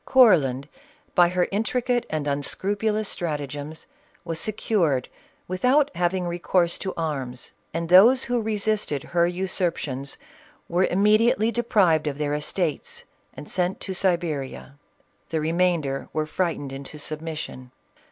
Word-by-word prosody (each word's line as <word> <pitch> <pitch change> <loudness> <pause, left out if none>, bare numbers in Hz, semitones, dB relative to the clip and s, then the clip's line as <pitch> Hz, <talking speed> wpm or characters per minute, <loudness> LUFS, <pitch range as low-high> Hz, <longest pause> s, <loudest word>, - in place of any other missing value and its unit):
Courland, 150 - +4 0.5
by 175 -2 +5
her 180 0 +1
intricate 240 +4 0
and 155 -2 -2
unscrupulous 205 +9 -1
stratagems, 150 -2 -5 0.4
was 165 -2 -3
secured 175 - 0 0.4
without 255 +11 +2
having 180 +1 0
recourse 175 0 0
to 190 - -3
arms, 135 -7 -4 0.2
and 165 +1 -3
those 220 +9 +7
who 245 -1 0
resisted 210 -9 -1
her 170 0 +1
usurpations 175 -7 -2 0.5
were 180 +2 +2
immediately 215 +3 +3
deprived 195 -10 +2
of 140 -1 -2
their 150 -1 -1
estates 150 +1 -2 0.3
and 150 - -9
sent 180 0 -1
to 190 - -4
Siberia. 170 -8 -1 0.6
The 160 - -1
remainder 160 -4 0
were 155 0 0
frightened 155 -4 -2
into 140 +2 -8
submission. 155 -4 -6
175 Hz, 120 wpm, -24 LUFS, 150-200 Hz, 0.6 s, those